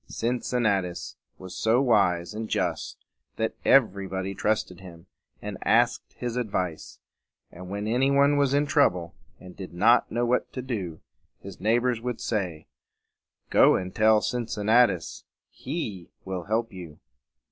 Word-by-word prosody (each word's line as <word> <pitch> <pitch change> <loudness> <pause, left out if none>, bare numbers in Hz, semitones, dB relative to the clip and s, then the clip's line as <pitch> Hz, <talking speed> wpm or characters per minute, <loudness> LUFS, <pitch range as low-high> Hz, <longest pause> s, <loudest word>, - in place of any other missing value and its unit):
Cin 120 +2 -2
cin 125 -1 -1
na 100 -3 +3
tus 90 -1 -7 0.2
was 95 -1 -10
so 115 +3 +2
wise 100 -7 +2
and 110 +1 -5
just - - -2 0.4
that 110 - -1
every 100 -7 +3
body 95 +1 -4
trusted 105 -3 -1
him, 85 -3 -13 0.4
and - - -6
asked - - +2
his 120 0 -4
advice; 95 -8 -3 0.5
and 90 +1 -10
when 100 +1 -4
any 125 +5 +2
one 140 +1 +4
was 140 -2 +2
in 145 +1 +2
trouble, 90 - +1 0.3
and 90 - -12
did 95 -3 -9
not 115 +7 +4
know 120 +2 0
what 125 +1 0
to 130 - -5
do, 95 -11 -5 0.4
his 100 -1 -11
neighbors 120 +3 +1
would 125 -1 -4
say, 90 -8 -3 0.9
"Go - - +6
and 90 0 -3
tell 110 0 +4
Cincinnatus. 115 -5 +1 0.3
He 110 - -5 0.2
will 95 -3 -4
help 115 +2 -1
you." 85 -5 -10
110 Hz, 150 wpm, -26 LUFS, 90-120 Hz, 0.9 s, Go